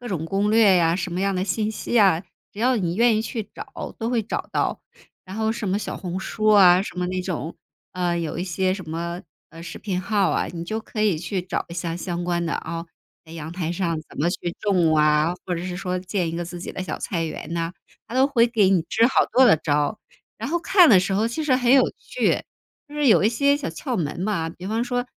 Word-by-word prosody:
各 245 - -7
种 165 -5 -3
攻 195 +4 0
略 215 -4 +5
呀， 165 -1 +3
什 180 -1 -4
么 180 - -2
样 195 0 +1
的 185 +1 -1
信 210 +2 -1
息 230 - -5
呀， 195 -6 +4 0.3
只 205 - -13
要 255 +3 +3
你 175 -4 -1
愿 230 -1 +4
意 220 - 0
去 225 -2 -5
找 - - -8
都 230 +1 -2
会 240 - +2
找 215 - -4
到。 - - -1 0.4
然 190 +2 -8
后 220 0 0
什 215 -3 -4
么 195 - +1
小 - - -5
红 180 0 -4
书 215 +3 -3
啊 190 -3 +7
什 185 - -8
么 180 - 0
那 185 0 -2
种， 170 -3 -4 0.4
呃， 175 -1 -1
有 165 -2 -3
一 175 - -1
些 185 +1 0
什 185 -5 -9
么， 170 +3 -4 0.3
呃， 165 0 -11
视 170 - -8
频 185 -4 -3
号 200 0 +1
啊， - - 0
你 170 -1 -5
就 215 +6 -3
可 220 0 -6
以 205 -6 +2
去 180 +4 -3
找 180 - -3
一 170 - -8
下 170 -1 -3
相 175 -1 -4
关 175 -1 0
的 165 - -2
啊， 165 +1 -5 0.4
在 160 - -16
阳 160 -1 -7
台 175 -2 -3
上 170 -2 -1
怎 - - -13
么 155 - +2
去 175 -1 -4
种 175 -6 +2
啊， 150 +2 +3
或 180 - -2
者 170 - -4
是 180 0 -4
说 185 -1 -2
建 180 -1 -2
一 165 - -4
个 175 - -3
自 175 +1 -7
己 - - -6
的 - - -4
小 185 - -5
菜 170 -4 -2
园 160 +1 -6
呐， 165 0 -2 0.4
它 - - -7
都 260 +1 +4
会 245 -5 +3
给 215 -5 +3
你 185 -4 +3
支 230 +1 +4
好 265 - +3
多 260 - +6
的 225 -10 +6
招。 150 +7 -1 0.4
然 - - -5
后 345 - +1
看 355 0 +5
的 200 - +8
时 185 +2 -1
候 210 +3 +2
其 275 +7 -3
实 275 -4 +3
很 245 -1 +3
有 270 -1 +7
趣， - - -1 0.5
就 295 - -12
是 295 -1 +1
有 215 - +5
一 - - +5
些 280 +5 +2
小 290 -1 -4
窍 255 -5 -4
门 160 -1 -3
嘛。 185 -4 -1
比 175 +2 -11
方 225 +3 0
说 245 0 -1
185 Hz, 270 characters per minute, -23 LUFS, 170-220 Hz, 0.5 s, 的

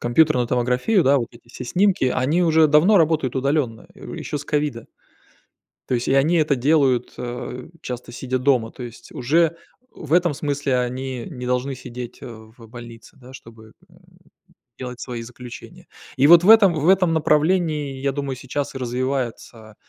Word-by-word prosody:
компьютерную 125 0 +2
томографию, 125 - +1
да. 140 +1 +4
Вот 120 - -4
эти 115 0 -19
все 125 - -8
снимки. 185 +2 +1
Они 145 +8 +1
уже 160 -2 +4
давно 160 +8 +5
работают 155 -5 +1
удалённо, 130 -4 -1
э, - - -14
у, - - -8
ещё 150 - -5
с 140 - -9
ковида. 145 -6 -2 1.0
То 125 - 0
есть 120 - -2
и - - +2
они 150 +6 +3
это 150 -3 +2
делают, 130 -2 +1
э, 125 +1 -6
часто 125 -1 -7
сидя 130 +1 -3
дома. 125 -4 +1
То 125 - -10
есть, 120 -1 -11
уже, 160 +6 +1 0.4
в 155 -2 -8
этом 175 -3 +3
смысле, 145 -3 -1
они 125 0 -4
не 125 -5 -7
должны 125 +2 -1
сидеть, 125 -1 -9
э, - - -7
в 115 0 -13
больнице, 120 +2 -12
да, 130 0 -15
чтобы, 115 -3 -14 0.2
м, - - -22 0.8
делать 125 -1 -7
свои 120 -2 -6
заключения. 120 +1 -11 0.3
И 135 +2 +4
вот 170 +1 +8
в 195 - +3
этом 205 -6 +7
в 155 +2 0
этом 185 -3 +3
направлении, 150 -3 +1
я 140 0 0
думаю, 140 -1 -4
сейчас 135 +2 -5
и - - -3
развивается 125 -3 -4
130 Hz, 175 wpm, -21 LUFS, 125-155 Hz, 1.0 s, вот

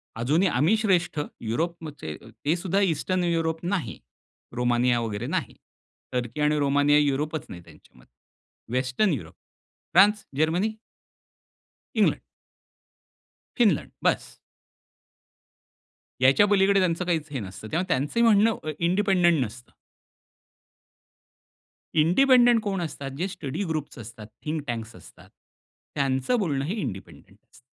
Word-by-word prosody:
अजूनही 145 +11 +2
आम्ही 150 - +2
श्रेष्ठ, 180 -7 +1 0.2
युरोपचे. 145 - -4 0.3
ते 155 +4 +3
सुद्धा 190 +3 0
ईस्टर्न 185 0 0
युरोप 165 -1 -1
नाही, 180 -2 -2 0.6
रोमानिया 120 0 +2
वगैरे 110 +1 -4
नाही, - - -3 0.6
टर्की 125 +2 -3
आणि 150 0 +2
रोमानिया 145 +1 +3
युरोपच 150 +2 -1
नाही 85 - -9
त्यांच्यामध्ये. - - -20 0.6
Western 130 +10 +1
Europe 135 - -6 0.6
France, 205 +3 +5
Germany 175 +8 +1 1.2
England - - +3 1.4
Finland 210 - +2
बस. - - 0 1.9
याच्या 135 +10 +6
पलीकडे 200 -1 +4
त्यांचं 180 -1 0
काहीच 160 -4 -1
हे 135 - -3
नसतं. 100 +1 -8
तेव्हा 175 +4 0
त्यांचं 150 - 0
म्हणणं 220 -1 +4
अ, 155 - -4
इंडिपेंडेंट 175 -4 +2
नसतं. 120 +3 -9 2.3
इंडिपेंडेंट 240 - +5
कोण 195 -3 -2
असतात 140 -4 -5
जे 180 +5 -1
स्टडी 170 -3 -5
ग्रुप्स 155 -3 -4
असतात, 110 -1 -10 0.2
थिंक 155 0 -2
टँक्स 115 -1 -5
असतात, - - -16 0.7
त्यांचं 135 - +1
बोलणं 145 -9 -1
हे 170 - -2
इंडिपेंडेंट 100 - -8 0.2
अस - - -18
155 Hz, 115 wpm, -25 LUFS, 130-185 Hz, 2.3 s, याच्या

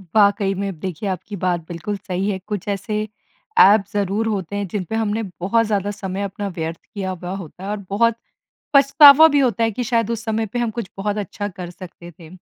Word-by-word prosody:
वाक़ई 200 -1 +4
में 200 +1 -2
अब 195 - -5
देखिए 190 +2 -4
आपकी 190 +3 -5
बात 180 -1 0
बिल्कुल 180 +4 -4
सही 190 +1 -3
है। 190 - -1
कुछ 210 -2 -4
ऐसे 205 +2 -2 0.6
ऐप 200 +2 +7
ज़रूर 205 +2 0
होते 200 -3 -3
हैं 200 -1 -2
जिन 195 +2 -3
पे 220 - -2
हमने 225 0 -1 0.2
बहुत 230 +5 +2
ज़्यादा 205 -1 -1
समय 195 -1 -5
अपना 200 +1 -4
व्यर्थ 165 -2 -5
किया 195 -2 -3
हुआ 180 0 -6
होता 185 -1 -9
है 195 - -5
और 210 - -2
बहुत 230 +3 +2 0.6
पछतावा 280 +2 +8
भी 290 -2 +2
होता 235 -5 +2
है 225 - +2
कि 245 +4 -3
शायद 230 -1 0
उस 230 0 -3
समय 220 0 0
पे 230 +4 -4
हम 235 -2 0
कुछ 225 -3 -5
बहुत 205 +1 -2
अच्छा 205 +1 -4
कर 180 -2 -8
सकते 175 -1 -11
थे। 160 -2 -12
205 Hz, 215 wpm, -21 LUFS, 185-220 Hz, 0.6 s, पछतावा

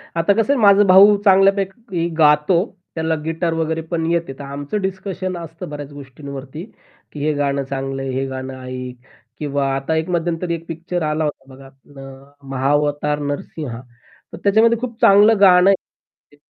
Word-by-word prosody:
आता 165 +4 +2
कसं 230 +6 +1
आहे - - 0
माझा 200 0 +6
भाऊ 195 +3 +7
चांगल्यापैकी 195 -1 +2
गातो. 155 +4 +3 0.3
त्याला 160 0 -1
गिटार 165 +1 -1
वगैरे 160 0 -2
पण 165 -1 -1
येते. 170 -5 -1
तर - - -7
आमचं 140 +8 -5
डिस्कशन 190 -1 -4
असतं 165 -2 -8
बऱ्याच 145 -1 -8
गोष्टींवरती 140 +2 -9 0.5
की 150 - -9
हे 155 0 +1
गाणं 140 -1 -1
चांगलंय, 135 0 -4
हे 135 +1 -2
गाणं 130 0 -6
ऐक 130 0 -7 0.4
किंवा 145 -2 -1
आता 135 +4 -2
एक 160 +2 -2
मध्यंतरी 170 0 -1
एक 165 0 -10
पिक्चर 170 +2 -4
आला 155 +1 -1
होता 145 -3 -4
बघा 135 +1 -14
अ, 135 +1 -15
"महावतार 145 +2 0
नरसिंह" 145 -3 -5 0.5
तर - - -7
त्याच्यामध्ये 220 +3 +4
खूप 240 -2 -6
चांगलं 205 +2 +6
गाणं 185 -1 +6
आहे. 190 -5 -5
160 Hz, 155 wpm, -19 LUFS, 140-185 Hz, 0.5 s, भाऊ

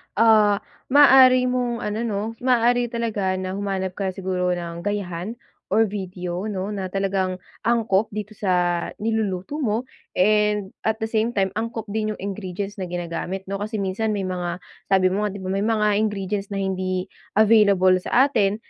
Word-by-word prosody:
ah, 215 -2 +4 0.2
maaari 260 -2 +7
mong 245 -2 -1
ano 210 +1 -2
'no, 200 -2 -1 0.2
maaari 245 -1 +3
talaga 220 -5 -1
na 185 0 -3
humanap 195 -1 -2
ka 190 0 -3
siguro 180 -2 -1
ng 170 -1 -6
gayahan 200 +1 -3 0.3
or 220 +3 +4
video 185 -2 -4
no? 200 -1 -3
Na 195 -2 -3
talagang 190 -1 -1 0.2
angkop 225 -3 +2
dito 210 0 -4
sa 180 -4 0 0.2
niluluto 220 +3 -1
mo 230 -4 0 0.3
and 210 0 +2 0.2
at 220 - +2
the 220 - -3
same 225 +2 0
time 190 -1 +1
angkop 225 0 -4
din 215 0 -1
yung - - -19
ingredients 195 0 -5
na 185 - -3
ginagamit 175 +2 -4
no? 195 - -2
Kasi 215 +2 -4
minsan 210 +3 -1
may 200 - -2
mga 180 -1 -3 0.2
sabi 190 -1 +3
mo 210 +2 0
nga - - -3
di 195 - -7
ba 185 - -3
may 195 +2 0
mga 210 -2 +2
ingredients 205 -1 -2
na 200 - -6
hindi 185 -1 -1 0.3
available 200 -4 +5
sa 265 +9 +3
atin. 205 -6 +2
200 Hz, 165 wpm, -23 LUFS, 185-220 Hz, 0.3 s, maaari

